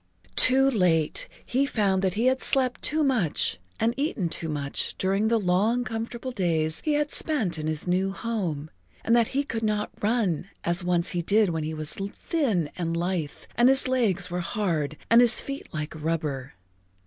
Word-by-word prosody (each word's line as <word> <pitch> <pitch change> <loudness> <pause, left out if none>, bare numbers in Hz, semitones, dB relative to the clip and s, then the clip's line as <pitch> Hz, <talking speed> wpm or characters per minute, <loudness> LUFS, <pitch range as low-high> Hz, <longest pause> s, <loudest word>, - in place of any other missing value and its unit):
Too 265 +1 +6
late 180 - +1 0.2
he 270 +3 +1
found 195 -6 +1
that 190 -2 0
he 225 +3 0
had 260 0 +2
slept 255 -2 0
too 310 +1 +1
much 230 - +1 0.2
and 230 +1 +2
eaten 270 - -1
too 160 0 -3
much 140 -2 -1
during 195 +3 +1
the 230 0 +2
long, 205 +6 +1
comfortable 235 +2 -5
days 165 -7 0
he 305 - +1
had 295 -1 -1
spent 215 - 0
in 155 - -3
his 155 -1 -1
new 185 +2 +1
home, 185 -10 -3 0.3
and 230 - +4
that 235 -2 +4
he 285 - +2
could 230 -5 -4
not 210 -1 -1
run 205 -5 0
as 175 +2 0
once 175 -1 +2
he 175 - -1
did 205 +3 +3
when 160 -2 -2
he 155 +1 -4
was 155 -1 -5
thin 200 - -1
and 170 -2 -2
lithe 170 -4 -1 0.2
and 240 +2 +5
his 270 0 +3
legs 205 -8 +1
were 180 - -2
hard 165 -6 -2
and 230 +1 +8
his 240 -2 +4
feet 275 0 -6
like 155 -1 -4
rubber. 150 -5 -3
195 Hz, 185 wpm, -26 LUFS, 165-240 Hz, 0.3 s, and